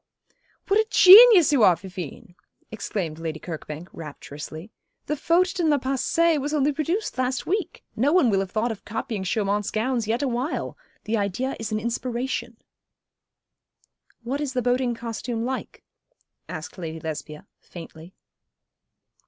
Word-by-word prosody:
"' - - -41
'What 400 +2 +3
a 440 - +2
genius 395 -3 +9
you 280 -5 +3
are, 185 -4 +6
Fifine,' 185 - -9 0.4
exclaimed 190 -7 -4
Lady 160 -1 -4
Kirkbank, 160 0 -7
rapturously. 155 +4 -9 0.3
'The 300 - -1
Faute 345 +5 +2
dans 335 -3 +2
le 295 - +4
Passé 280 +4 +1
was 295 +3 -2
only 290 0 +2
produced 315 - -2
last 255 0 -1
week. 390 -2 -3
No 260 +6 +2
one 320 -10 +4
will 195 - +2
have 195 -1 -2
thought 225 +4 -1
of 215 - -8
copying 220 -2 -4
Chaumont's 205 +1 -1
gowns 230 0 -1
yet 230 +5 0
awhile. 255 +3 -2 0.3
The 220 +1 -1
idea 205 +7 -2
is 225 -1 -5
an 215 - 0
inspiration.' 240 +3 -3 1.7
'What 270 +5 -3
is 285 -3 -3
the 250 -2 -1
boating 245 0 +1
costume 230 0 -4
like?' 260 +1 -5 0.7
asked - - -7
Lady 160 -2 -5
Lesbia, 155 -1 -7
faintly. 165 0 -12
235 Hz, 145 wpm, -24 LUFS, 190-285 Hz, 1.7 s, genius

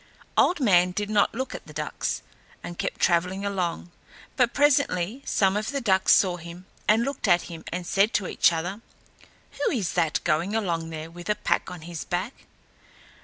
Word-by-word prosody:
Old 360 - +3
Man 180 -8 +4
did 205 +2 -3
not 210 +1 +2
look 260 +2 -3
at - - -8
the - - -11
ducks, - - -3 0.4
and 175 - -8
kept - - -3
travelling 180 +3 +1
along; 180 -3 -2 0.4
but 245 -3 +3
presently 275 - +2
some 195 -1 +2
of 215 +3 -1
the 280 - -1
ducks 190 -6 +3
saw 180 -3 +2
him 170 +2 -10 0.2
and 220 +2 +4
looked 275 -3 -2
at 175 -2 +4
him 165 -1 -9
and 180 +1 -4
said 200 +5 +2
to 200 - +1
each - - +3
other, 175 +6 -3 0.7
"Who 285 - -1
is 210 -9 -1
that 165 -3 +1
going 170 +7 0
along 170 -7 -1
there 160 0 -7
with 175 +3 -9
a 210 - +3
pack 210 - 0
on 180 -2 -8
his 165 -1 -6
back?" 185 +8 -4
185 Hz, 185 wpm, -26 LUFS, 175-215 Hz, 0.7 s, Man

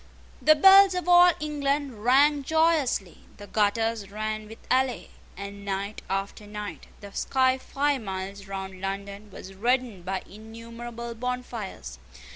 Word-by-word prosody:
The 310 - +6
bells 385 +3 +7
of 360 0 -3
all 355 0 +8
England 280 -5 -2
rang 285 +4 +4
joyously: 310 - +1 0.2
the 205 - -10
gutters 215 0 0
ran 215 +1 -4
with 225 +1 -11 0.2
ale; 260 -1 +1 0.3
and, 200 +1 -8
night 200 +1 -4
after 195 +2 -3
night, 210 0 -7
the 200 -1 -10
sky 260 0 +1
five 280 0 -1
miles 195 0 -6
round 190 -1 -6
London 200 +2 -5
was 190 0 -11
reddened 235 -2 -1
by 190 +1 -3
innumerable 230 +3 -9
bonfires. 230 - -5
225 Hz, 130 wpm, -26 LUFS, 200-265 Hz, 0.3 s, all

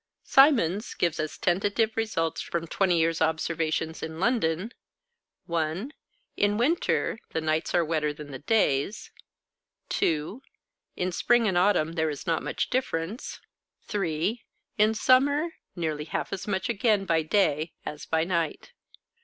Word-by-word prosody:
Symons 235 - +4
gives 170 -3 0
as 155 0 -3
tentative 205 +5 +1
results 165 -8 -1
from 170 -1 -3
twenty 180 +1 +1
years' 165 0 +1
observations 160 0 -1
in 160 0 -6
London 195 -2 +1 0.7
(1) 170 - -2 0.4
In 205 0 +2
winter, 255 -2 +1
the - - 0
nights 155 0 -1
are 170 -1 +3
wetter 155 -2 0
than 145 0 -10
the 135 - -7
days; 155 - 0 0.8
(2) 160 - -1 0.5
in 185 0 -1
spring 235 +5 +3
and 190 - 0
autumn, 175 -3 +3
there 160 -2 0
is 145 - -6
not 165 -2 0
much - - -3
difference; 225 - -2 0.4
(3) 195 +3 -2 0.4
in 215 +1 +4
summer, 285 +7 +3 0.3
nearly 155 -4 -2
half - - -3
as 195 - -5
much 190 -2 -1
again 215 -3 +1
by 165 -3 +2
day 160 -2 +1
as 150 0 -6
by 160 0 +1
night. 170 - -2
170 Hz, 135 wpm, -27 LUFS, 160-215 Hz, 0.8 s, Symons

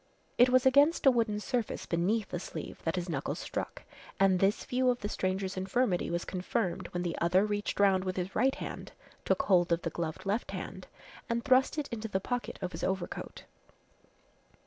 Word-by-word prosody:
It 245 +1 +7
was 255 0 +4
against 285 +6 +5
a 270 - +9
wooden 225 -4 +1
surface 240 +1 -2
beneath 190 +5 0
the 175 - -3
sleeve - - -7
that 165 +2 0
his 180 -1 -2
knuckles 150 -6 -2
struck, - - -5 0.4
and 190 -1 +4
this 195 +3 +2
view 255 0 +1
of 245 -1 0
the 205 - -2
stranger's 190 -1 -2
infirmity 190 0 0
was 170 0 -2
confirmed 185 +1 -2
when 175 0 -3
the 175 -2 -2
other 180 +4 +4
reached 205 -1 -2
round 195 -2 +4
with 185 -1 -3
his 185 +1 -3
right 265 +4 +3
hand, - - -7 0.3
took - - +2
hold 175 -3 +3
of 170 0 +1
the - - -2
gloved 165 +2 -4
left 205 +5 -1
hand - - -6 0.4
and 235 0 -1
thrust 260 +3 +4
it 295 -2 -1
into 225 -1 -4
the 190 -3 -1
pocket 245 +5 -3
of 180 - -2
his - - -6
overcoat. 190 -2 -3
195 Hz, 190 wpm, -31 LUFS, 180-240 Hz, 0.4 s, a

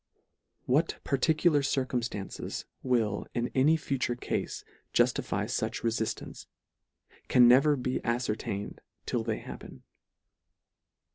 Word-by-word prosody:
What 150 +6 +2
particular 155 +2 +3
circumftances 125 -7 -2 0.2
will 115 -5 0
in 120 0 0
any 145 +5 +4
future 130 -5 -1
cafe 120 - -2 0.5
juftify - - +2
fuch - - -2
refiftance, 115 -1 -3 0.8
can 125 -1 +6
never 140 +5 +6
be 130 -1 -2
afcertained 110 -4 -2 0.3
till 115 - -1
they 110 -1 -1
happen. - - -10
125 Hz, 95 wpm, -29 LUFS, 115-140 Hz, 0.8 s, can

